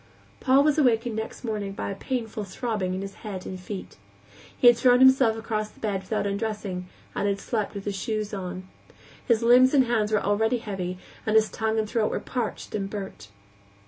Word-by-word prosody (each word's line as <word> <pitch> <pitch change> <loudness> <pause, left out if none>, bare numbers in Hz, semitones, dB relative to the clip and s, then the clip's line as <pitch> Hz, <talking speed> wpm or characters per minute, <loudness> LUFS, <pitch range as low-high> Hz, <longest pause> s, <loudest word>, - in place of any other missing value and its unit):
Paul 270 +2 +4
was 300 0 +3
awakened 240 -4 +2
next 220 +3 -5
morning 210 -4 -3
by 200 - -4
a - - -4
painful 225 -1 -3
throbbing 200 -2 -2
in 190 - -4
his 195 0 -7
head 195 -4 -6
and 185 - -6
feet. 190 +1 -7 0.6
He - - 0
had 240 0 +9
thrown 245 +1 +5
himself 260 -3 +6
across 215 -1 -2
the - - -21
bed 200 -3 -1
without 210 +2 -2
undressing, 200 -3 -3 0.3
and 205 - -1
had 200 0 0
slept 215 -1 -2
with 200 - -6
his 200 - -2
shoes 215 0 -3
on. 185 -1 -5 0.6
His 230 -1 +3
limbs 255 +4 +6
and 270 - +6
hands 220 -3 0
were 215 - +3
lead 215 +4 +1
heavy, 185 -4 -4 0.3
and 215 - 0
his 220 0 +4
tongue 220 0 -1
and 215 -1 0
throat 215 0 +1
were - - -2
parched 240 -4 -4
and 195 -2 -2
burnt. 195 - -7
215 Hz, 200 wpm, -26 LUFS, 200-235 Hz, 0.6 s, had